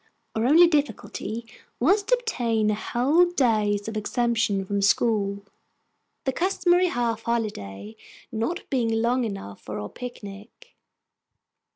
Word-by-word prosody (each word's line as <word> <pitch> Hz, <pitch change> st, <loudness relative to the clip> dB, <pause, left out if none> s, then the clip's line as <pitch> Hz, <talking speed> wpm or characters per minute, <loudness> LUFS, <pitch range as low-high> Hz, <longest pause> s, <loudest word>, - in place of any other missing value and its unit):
Our 220 Hz, +2 st, 0 dB
only 330 Hz, +6 st, +7 dB
difficulty 235 Hz, -, -2 dB, 0.3 s
was 380 Hz, -, +4 dB
to 460 Hz, +5 st, +3 dB
obtain 235 Hz, -, 0 dB
a -, -, +1 dB
whole 260 Hz, +10 st, +2 dB
day's 215 Hz, -, +1 dB
exemption 220 Hz, -2 st, 0 dB
from 200 Hz, +1 st, -1 dB
school, 200 Hz, -1 st, +1 dB, 0.8 s
the 265 Hz, -, -1 dB
customary 360 Hz, +1 st, +2 dB
half 235 Hz, -7 st, -1 dB
holiday 110 Hz, -, -3 dB, 0.4 s
not 235 Hz, -, -3 dB
being 245 Hz, -4 st, +1 dB
long 235 Hz, +3 st, +1 dB
enough 150 Hz, -, -7 dB
for 105 Hz, +1 st, -6 dB
our 105 Hz, -, -5 dB
picnic. 235 Hz, -, -10 dB
230 Hz, 115 wpm, -25 LUFS, 205-275 Hz, 0.8 s, only